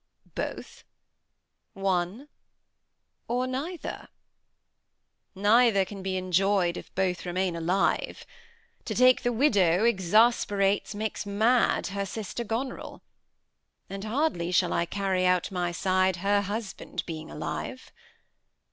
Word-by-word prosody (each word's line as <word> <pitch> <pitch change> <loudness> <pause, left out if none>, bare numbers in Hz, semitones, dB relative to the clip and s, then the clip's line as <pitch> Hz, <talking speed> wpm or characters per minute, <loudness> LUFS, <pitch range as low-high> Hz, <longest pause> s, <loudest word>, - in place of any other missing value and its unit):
Both? - - -6 0.9
one? 195 +6 -1 1.0
or 250 +2 0
neither? 285 +8 -5 1.3
Neither 205 0 +4
can 195 +1 -9
be 190 0 -2
enjoy'd, 185 0 +1
If - - -10
both 185 -1 0
remain 180 0 -1
alive. 175 +4 0 0.6
To - - -3
take 255 0 +5
the 245 - 0
widow 205 - +3
Exasperates, 205 -1 +2
makes 215 0 -3
mad 225 +5 +2
her 200 0 -2
sister 220 +3 -5
Goneril; 235 +4 -5 0.9
And 195 0 -5
hardly 215 - -1
shall 180 -1 +2
I 170 - 0
carry 190 -1 -1
out 180 +1 +1
my 175 -2 -1
side, 185 +1 +1
Her 200 +3 +1
husband 205 +1 -5
being 160 -1 -7
alive. 255 +10 -6
195 Hz, 110 wpm, -27 LUFS, 185-225 Hz, 1.3 s, take